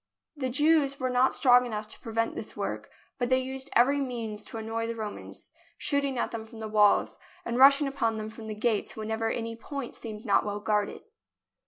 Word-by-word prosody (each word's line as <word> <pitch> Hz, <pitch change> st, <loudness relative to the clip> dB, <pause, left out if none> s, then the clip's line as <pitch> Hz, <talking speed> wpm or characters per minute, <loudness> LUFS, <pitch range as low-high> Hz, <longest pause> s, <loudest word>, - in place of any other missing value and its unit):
The 260 Hz, -3 st, -2 dB
Jews 290 Hz, 0 st, +3 dB
were 255 Hz, -1 st, -1 dB
not 250 Hz, +1 st, +4 dB
strong 250 Hz, -2 st, +5 dB
enough 215 Hz, -3 st, -4 dB
to -, -, -7 dB
prevent 230 Hz, 0 st, -2 dB
this -, -, -7 dB
work, -, -, -4 dB, 0.3 s
but 245 Hz, -1 st, 0 dB
they 255 Hz, -, +4 dB
used 265 Hz, +1 st, -4 dB
every 280 Hz, +4 st, +4 dB
means 230 Hz, -5 st, -4 dB
to -, -, -7 dB
annoy 225 Hz, +1 st, -3 dB
the 230 Hz, -, -3 dB
Romans, 215 Hz, -2 st, -7 dB, 0.3 s
shooting 280 Hz, -2 st, 0 dB
at -, -, -1 dB
them 230 Hz, -1 st, -5 dB
from 225 Hz, 0 st, -12 dB
the 220 Hz, -, -4 dB
walls, 210 Hz, -1 st, +3 dB, 0.3 s
and 235 Hz, +1 st, -1 dB
rushing 280 Hz, +2 st, +7 dB
upon 230 Hz, -5 st, -1 dB
them 215 Hz, 0 st, -4 dB
from 220 Hz, 0 st, -10 dB
the 215 Hz, -, -4 dB
gates 215 Hz, 0 st, 0 dB
whenever 220 Hz, +1 st, -2 dB
any 230 Hz, 0 st, -3 dB
point 270 Hz, +2 st, -6 dB
seemed 220 Hz, -1 st, -8 dB
not 205 Hz, -, +3 dB
well 205 Hz, 0 st, -3 dB
guarded. 210 Hz, -1 st, -1 dB
230 Hz, 200 wpm, -28 LUFS, 220-260 Hz, 0.3 s, rushing